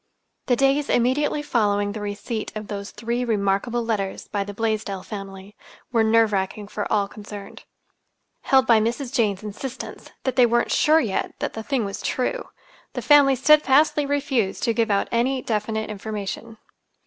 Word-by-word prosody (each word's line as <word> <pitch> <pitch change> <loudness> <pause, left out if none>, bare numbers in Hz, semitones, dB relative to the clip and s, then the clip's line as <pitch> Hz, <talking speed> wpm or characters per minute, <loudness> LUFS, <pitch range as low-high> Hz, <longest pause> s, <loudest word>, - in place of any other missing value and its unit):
The 245 - +4
days 275 +3 +2
immediately 290 +5 +1
following 205 -6 +1
the 210 0 -6
receipt 210 +2 -4
of 215 -1 -5 0.2
three 235 +1 -3
remarkable 225 +1 0
letters 200 -4 -2
by 200 -1 -1
the 205 - -7
Blaisdell 210 -3 -2
family 195 -1 -8 0.4
were 230 -2 +3
nerve 220 -1 +3
racking 200 +1 -2
for 210 - -4
all 205 -2 +2
concerned. 205 -1 -10 0.8
Held 265 -1 +4
by 230 -3 +5
Mrs. 240 +4 -2
Jane's 210 -6 +1
insistence 240 +5 -7
that 260 -1 -2
they 245 -1 +6
weren't 240 +1 +1
sure 310 +1 +4
yet 205 -6 -2
that - - -3
the 220 - -5
thing 250 -1 -1
was 200 - -5
true, 380 - -2 0.4
the - - -4
family 285 -2 +6
steadfastly 295 +1 +4
refused 270 -8 0
to 230 - +2
give 230 0 +1
out 200 -1 +1
any 255 +3 +1
definite 220 0 -2
information. 215 +2 -6
225 Hz, 160 wpm, -23 LUFS, 205-260 Hz, 0.8 s, they